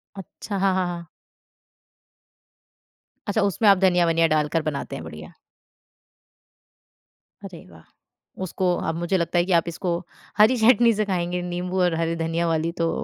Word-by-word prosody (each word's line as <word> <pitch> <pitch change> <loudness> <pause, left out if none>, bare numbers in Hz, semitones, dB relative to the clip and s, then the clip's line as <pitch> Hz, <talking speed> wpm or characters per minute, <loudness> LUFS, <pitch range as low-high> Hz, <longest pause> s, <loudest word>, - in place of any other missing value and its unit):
अच्छा, 200 +1 -7
हाँ, 190 0 +2
हाँ, 185 -1 0
हाँ। 170 -1 -6 2.2
अच्छा, 210 +2 0
उसमें 200 +2 +1
आप 195 - +6
धनिया-वनिया 175 -3 +3
डाल 150 - 0
कर 165 - +3
बनाते 140 - -6
हैं, - - -7
बढ़िया। 80 -1 -10 2.1
अरे 180 -4 -10
वाह! 80 -1 -16 0.6
उसको 185 0 -1 0.2
अब - - -7
मुझे 175 +3 0
लगता 170 0 -1
है 175 - +1
कि 185 - -4
आप 165 - -8
इसको 170 0 -2 0.4
हरी 220 +4 +5
चटनी 235 0 +5
से 215 0 -1
खाएँगे, 180 -2 -2
नींबू 180 +1 -3
और 175 - +2
हरी 165 0 -1
धनिया 165 +1 -1
वाली 165 0 0
तो। 165 - +1
175 Hz, 150 wpm, -23 LUFS, 165-195 Hz, 2.2 s, आप